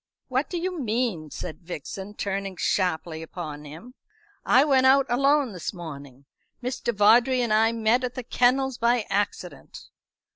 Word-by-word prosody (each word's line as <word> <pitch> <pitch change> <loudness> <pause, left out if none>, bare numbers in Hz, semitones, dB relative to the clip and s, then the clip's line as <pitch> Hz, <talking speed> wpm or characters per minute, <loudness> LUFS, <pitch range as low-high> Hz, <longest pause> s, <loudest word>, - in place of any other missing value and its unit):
"What 260 +3 -1
do 355 - -3
you 360 0 -3
mean?" 220 - -1
said 160 +2 -7
Vixen, 190 +4 -7
turning 195 -2 -3
sharply 170 -4 -1
upon 155 -3 -7
him. 165 +12 -11 0.5
"I 260 +3 +5
went 265 -3 +4
out 270 +1 +5
alone 275 0 +2
this 180 +2 -5
morning. 140 -5 -10 0.3
Mr. 250 -1 -2
Vawdrey 235 +5 +4
and 235 -3 +1
I 220 +1 +4
met 230 +2 +1
at 250 -1 -3
the 255 - -5
kennels 255 +2 +1
by 235 -1 +2
accident." 205 +1 -3
225 Hz, 150 wpm, -25 LUFS, 180-255 Hz, 0.5 s, I